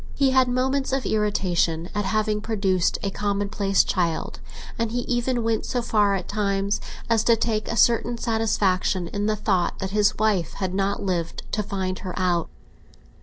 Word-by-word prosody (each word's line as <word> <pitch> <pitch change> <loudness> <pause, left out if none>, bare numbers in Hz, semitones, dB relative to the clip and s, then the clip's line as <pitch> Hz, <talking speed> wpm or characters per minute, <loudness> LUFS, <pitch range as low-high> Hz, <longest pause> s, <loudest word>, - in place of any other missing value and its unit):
He 275 -2 +3
had 260 -1 +4
moments 265 +2 0
of 270 0 -1
irritation 180 -6 0
at 205 -1 -1
having 215 +1 0
produced 195 -5 +1
a 200 - -1
commonplace 200 -1 +1
child, 170 -3 -1 0.4
and 230 -1 0
he 245 +1 -1
even 240 0 -1
went 225 -1 0
so 245 -1 -2
far 205 -3 +2
at 190 - -4
times 200 -1 0 0.3
as 230 -1 +2
to 230 - +5
take 220 -1 -1
a 230 - -3
certain 235 +1 +3
satisfaction 200 -6 0
in 205 +3 -2
the 215 - +1
thought 190 -4 0
that 190 0 -4
his 210 0 +2
wife 210 -6 +1
had 190 -2 -3
not 195 +1 -1
lived 175 -4 -2
to 210 - 0
find 190 -2 -3
her 185 -2 -6
out. 175 -3 +1
205 Hz, 170 wpm, -24 LUFS, 190-225 Hz, 0.4 s, to